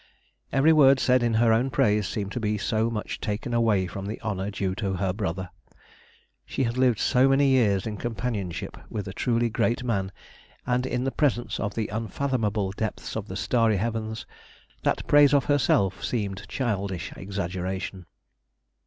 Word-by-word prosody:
Every 145 +4 +5
word 135 -3 +6
said 125 -1 +3
in 120 -2 +1
her 115 0 +4
own 120 +4 +2
praise 105 -7 +2
seemed 100 -3 -3
to 125 - -3
be 105 -1 0
so 110 +2 0
much 110 -2 -4
taken 110 +3 -3
away 110 -5 +2
from 95 +2 -6
the 105 - -5
honour 100 -2 -2
due 95 -2 -2
to 100 -1 -2
her 95 0 -1
brother. 95 -3 -3 0.9
She - - -2
had 115 -1 -1
lived 130 -3 +3
so 130 +4 +3
many 135 +1 +4
years 110 -8 +3
in 105 -2 -4
companionship 110 -5 -4
with 105 -2 -4
a 95 - -6
truly 120 +1 +1
great 120 +3 0
man, 100 -6 -1 0.5
and 125 +1 0
in 125 -1 -1
the 135 - 0
presence 125 -5 0
of 100 -2 -3
the 110 -2 -1
unfathomable 110 -3 -1
depths 105 +2 -4
of 110 -1 -4
the 95 - -6
starry 115 -1 +2
heavens, 110 +1 -3 0.6
that - - 0
praise 145 -1 +6
of 140 - +3
herself 100 -9 +2
seemed 100 -4 -3
childish 100 -8 -2
exaggeration. 95 -1 -4
110 Hz, 170 wpm, -26 LUFS, 100-125 Hz, 0.9 s, word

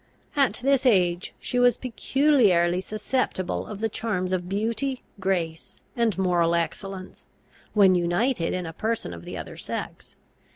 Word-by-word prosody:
At 275 -3 +2
this 275 -1 +3
age 180 -5 +2
she 250 - -2
was 245 -2 +5
peculiarly 230 - +2
susceptible 215 -2 -2
of 210 -1 -7
the 225 - +2
charms 185 -4 -2
of 180 -1 -2
beauty, 230 +6 -1 0.2
grace, 175 -4 -2 0.2
and 230 -4 +1
moral 175 -3 +2
excellence, 185 +2 -4 0.5
when 195 -3 +6
united 175 +3 +1
in 180 -1 -2
a 165 - -6
person 220 - -2
of 85 0 -10
the - - -6
other - - -7
sex. - - -6
195 Hz, 140 wpm, -25 LUFS, 175-235 Hz, 0.5 s, when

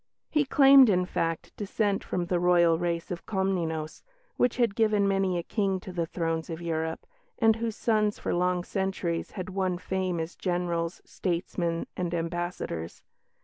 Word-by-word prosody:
He 300 -2 +2
claimed, 270 -2 +7
in 180 -2 +3
fact, 165 -2 -3
descent 205 0 0
from 180 -1 -2
the 175 0 0
Royal 170 -2 +4
race 170 -1 -2
of 175 - -6
Comnenus, 170 -6 -1 0.3
which 245 -1 +1
had 235 -5 +2
given 210 -2 +2
many 195 -2 +1
a 170 - -2
King 195 -2 0
to 185 - -8
the 170 -2 -2
thrones 165 -1 -2
of 165 -1 -4
Europe, 160 -1 -3 0.3
and 225 -1 +4
whose 225 -1 -2
sons 215 -3 +1
for - - -2
long 180 0 +1
centuries 190 -3 -2
had 185 0 -4
won 185 -2 0
fame 185 -1 -2
as 160 +1 -4
generals, 175 -1 -2
statesmen, 170 -1 -2
and 175 -1 -2
ambassadors. 170 - -4
180 Hz, 160 wpm, -28 LUFS, 170-195 Hz, 0.3 s, claimed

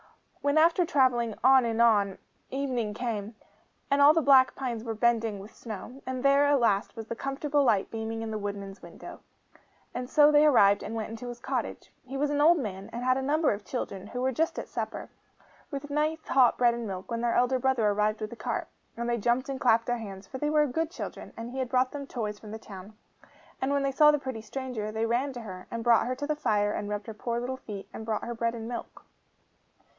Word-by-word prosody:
When 285 +1 +1
after 335 +3 +5
travelling 250 - +2
on 265 0 +7
and 230 -1 -1
on, 205 -4 +4 0.3
evening 250 -6 -2
came, 220 -2 -4 0.6
and 280 0 +4
all 295 +2 +8
the 325 - +2
black 265 -2 +6
pines 240 -4 -4
were 225 -2 -4
bending 225 -2 +1
with 200 +3 -11
snow, 235 +4 -8
and 260 0 -3
there, 280 +1 +5
at 285 -1 +4
last, 210 -3 +1
was 225 -1 -6
the 230 - -5
comfortable 280 +3 0
light 215 -7 +2
beaming 225 0 -4
in 225 - -4
the 215 - -3
woodman's 200 -1 -6
windows; - - -11 0.7
and 250 0 -5
so 295 0 +6
they 295 0 +6
arrived, 205 -8 +5
and 225 - -5
went 220 0 -4
into 230 +2 -7
his 240 0 -8
cottage. - - -4
He 265 +2 -6
was 290 +1 0
an 290 0 +1
old 335 +3 +6
man, 200 - -5
and 240 +1 -5
had 255 +1 +3
a - - -1
number 300 +3 +2
of 205 0 -7
children, 200 -6 -5
who 250 +3 -5
were 260 - +2
just 320 +6 -1
at - - -4
supper, - - -5 0.6
with 285 0 -6
nice 310 +2 -1
hot 255 -3 +4
bread 240 -1 +4
and 235 -1 -4
milk, 190 +2 -6
when 230 0 -2
their 235 -1 +1
elder 250 +1 +2
brother 255 -4 +2
arrived 210 +1 +1
with 215 - -4
the - - -7
cart. - - -3 0.3
And 235 0 -3
they 240 0 0
jumped 240 +5 +1
and 270 0 -4
clapped 230 -3 +4
their 245 -1 -1
hands; 195 -3 -8
for 260 - -8
they 295 - 0
were 300 0 +4
good 315 +4 -1
children; 345 - -7
and 230 +1 -6
he 265 - -5
had 255 -2 -2
brought 255 0 +2
them 280 -1 -6
toys 210 -5 -4
from 215 - -11
the 220 - -6
town. 205 -1 -11 0.6
And 265 - 0
when 280 -1 +1
they 275 - +1
saw 300 +3 +6
the 300 - +4
pretty 260 -5 -5
stranger, 220 -2 -5
they 220 +1 -1
ran 245 +5 0
to 245 - -7
her, 185 -4 -9
and 230 0 -4
brought 235 0 +4
her 255 - -1
to 290 +3 -4
the 305 +1 -1
fire, 205 -8 +1
and 205 - -4
rubbed 205 0 -3
her 225 - -7
poor 235 +2 -3
little 255 +2 -4
feet, 205 -6 -8
and - - -7
brought 220 -1 -2
her 240 - -4
bread 230 0 -1
and 225 -1 -6
milk. 240 -1 -7
240 Hz, 240 wpm, -28 LUFS, 220-270 Hz, 0.7 s, all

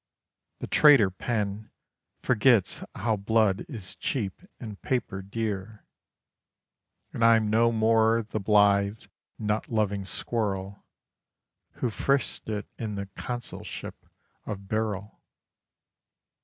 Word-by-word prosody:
The - - -2
traitor 140 -11 +6
pen 105 +1 -3 0.5
Forgets 115 -3 +3
how 110 +1 0
blood 105 -1 +2
is 105 -9 -6
cheap 105 -9 -3 0.2
and 110 -4 -8
paper 115 -7 -2
dear: 105 0 -4 1.3
And 115 - -1
I'm 115 -2 +5
no 115 +1 +4
more 115 0 +3
the 110 0 -4
blithe, 100 0 +3 0.3
nut 105 0 -2
loving 105 -3 0
squirrel 100 -2 -3 0.9
Who 120 - -2
frisked 135 0 -1
it 105 -1 -3
in 110 -3 -3
the 100 0 -5
consulship 120 -1 -6 0.4
of 100 -2 -6
Birrell. 105 -1 -3
110 Hz, 100 wpm, -27 LUFS, 100-115 Hz, 1.3 s, traitor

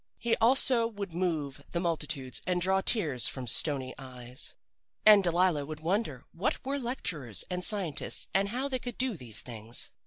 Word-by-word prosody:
He 235 0 +1
also 240 0 +4
would 205 -5 -7
move 155 -5 -2
the 170 - 0
multitudes 150 -7 -2
and 180 -1 +1
draw 190 +2 +2
tears 155 - +2
from 130 -2 -5
stony 130 +1 +1
eyes. 125 0 -4 0.5
"And 210 -2 +8
Delilah 175 -4 +2
would 155 0 -7
wonder 170 - -2
what 190 +9 -2
were 280 +1 -1
lecturers 165 - -1
and 180 0 -1
scientists, 190 -7 0
and 195 +1 +2
how 255 +5 -1
they 260 -2 0
could 245 -2 -5
do 255 -3 +1
these 120 - 0
things. 115 -1 -3
175 Hz, 165 wpm, -30 LUFS, 135-215 Hz, 0.5 s, And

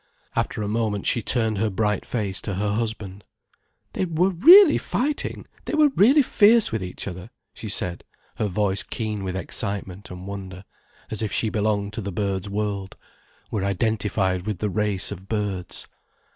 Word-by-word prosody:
After 105 - -1
a - - -2
moment, 105 -2 -1
she 120 - +1
turned 110 -3 +2
her 110 +1 +1
bright 105 0 -1
face 100 -6 -2
to 100 - -4
her 100 +2 -1
husband. 105 -3 -3 0.7
"They - - -1
were 175 +3 +1
really 330 - +8
fighting, 285 +4 -2 0.2
they - - -2
were 305 -1 +5
really 270 +4 +5
fierce 225 -2 +4
with 110 -3 -2
each 90 +1 -6
other!" 90 +3 -7 0.2
she 110 - -8
said, 90 -3 -2 0.3
her 110 - 0
voice 100 0 0
keen 110 -3 -4
with 95 -1 -3
excitement 95 +1 -5
and 90 0 -9
wonder, 95 -1 -7 0.5
as 110 - -3
if 110 - -2
she 110 - +1
belonged 105 -1 0
to 110 - -4
the 100 0 -4
birds' 100 +1 -2
world, 100 -1 -3 0.5
were 100 - -1
identified 100 -2 0
with 105 -3 -2
the 105 +2 -2
race 105 -1 0
of 95 -1 -8
birds. 100 -4 -3
105 Hz, 170 wpm, -24 LUFS, 95-110 Hz, 0.7 s, really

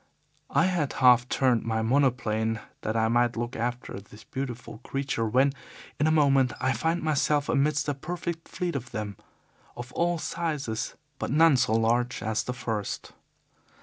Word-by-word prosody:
"I 165 - +3
had 175 -6 0
half 125 -1 +5
turned 125 -4 +2
my 110 -1 -1
monoplane, 115 -4 +1 0.2
that 110 +1 -1
I 110 0 +3
might 120 0 +2
look 120 +1 -3
after 120 -2 -3
this 105 +2 -15
beautiful 125 -4 -6
creature, 135 -4 -2
when, 130 +5 +3 0.5
in 150 - +3
a - - +4
moment, 135 -4 +4
I 130 - +1
found 160 +8 -1
myself 150 -1 +1
amidst 145 +2 +1
a 145 - +1
perfect 170 +3 -5
fleet 175 -3 -3
of 130 -3 -4
them, 105 -2 -4 0.6
of 120 +1 -7
all 175 0 +1
sizes, 150 -9 -3 0.2
but - - -2
none 160 +1 +5
so 125 -3 +2
large 120 +2 +1
as 110 0 0
the 125 - -4
first. 110 -4 -4
125 Hz, 160 wpm, -27 LUFS, 115-145 Hz, 0.6 s, half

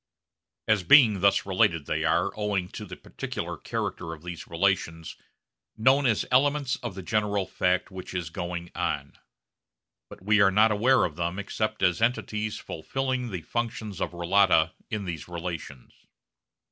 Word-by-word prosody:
As 110 -3 +3
being 110 - +6
thus 100 +1 +3
related, 85 -5 +2
they - - -1
are - - +2
owing 100 -4 -1
to - - -7
the - - -8
particular - - -6
character 80 -1 -4
of 80 - -19
these 90 -1 -7
relations 85 -2 -1 0.6
known 130 +5 +4
as 110 -3 +1
elements 140 +1 +2
of 120 -7 -6
the 95 - -7
general 105 0 0
fact 90 +1 0
which 95 0 -8
is 85 -3 -3
going 85 0 -5
on. - - -2 1.0
But - - -13
we 105 +1 +4
are 100 - +6
not 105 +3 +4
aware 125 +5 +4
of 80 -3 -5
them 85 +2 -2
except 110 +2 -3
as 90 +2 +2
entities 110 -2 -1
fulfilling 130 +7 -3
the 90 -6 -5
functions 110 -4 -4
of - - -2
relata 85 -2 +3 0.2
in 105 -3 -3
these 85 -5 -5
relations. 85 -6 -7
100 Hz, 155 wpm, -27 LUFS, 85-110 Hz, 1.0 s, being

